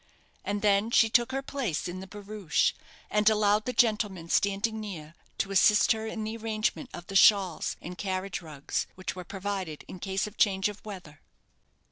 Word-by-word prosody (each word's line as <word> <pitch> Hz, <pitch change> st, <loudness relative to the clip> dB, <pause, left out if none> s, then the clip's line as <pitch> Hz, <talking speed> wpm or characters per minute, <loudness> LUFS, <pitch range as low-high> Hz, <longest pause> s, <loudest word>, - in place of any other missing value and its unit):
And 205 Hz, 0 st, -3 dB
then 205 Hz, +1 st, +3 dB
she 225 Hz, -1 st, +4 dB
took 240 Hz, +1 st, +3 dB
her 270 Hz, +1 st, -2 dB
place 240 Hz, -, -2 dB
in 180 Hz, +1 st, -5 dB
the 190 Hz, -, -8 dB
barouche, 205 Hz, -4 st, -1 dB, 0.4 s
and 210 Hz, 0 st, +4 dB
allowed 210 Hz, 0 st, +2 dB
the 250 Hz, -, -1 dB
gentlemen 210 Hz, -8 st, +1 dB
standing 200 Hz, +4 st, +1 dB
near 165 Hz, -7 st, -7 dB, 0.2 s
to 195 Hz, -, -1 dB
assist 210 Hz, +3 st, +5 dB
in 220 Hz, 0 st, -4 dB
the 220 Hz, +1 st, -4 dB
arrangement 225 Hz, +4 st, -2 dB
of 175 Hz, -, -8 dB
the 195 Hz, -, -8 dB
shawls 195 Hz, -4 st, +4 dB
and 180 Hz, +2 st, -6 dB
carriage 185 Hz, -1 st, -3 dB
rugs, 150 Hz, -4 st, -4 dB
which 185 Hz, 0 st, -5 dB
were 180 Hz, -, -6 dB
provided 190 Hz, -4 st, -5 dB
in 185 Hz, -, -9 dB
case 190 Hz, +1 st, -1 dB
of 210 Hz, 0 st, -10 dB
change 195 Hz, -1 st, +3 dB
of 205 Hz, 0 st, -10 dB
weather. 180 Hz, -8 st, -10 dB
200 Hz, 175 wpm, -28 LUFS, 185-215 Hz, 0.4 s, assist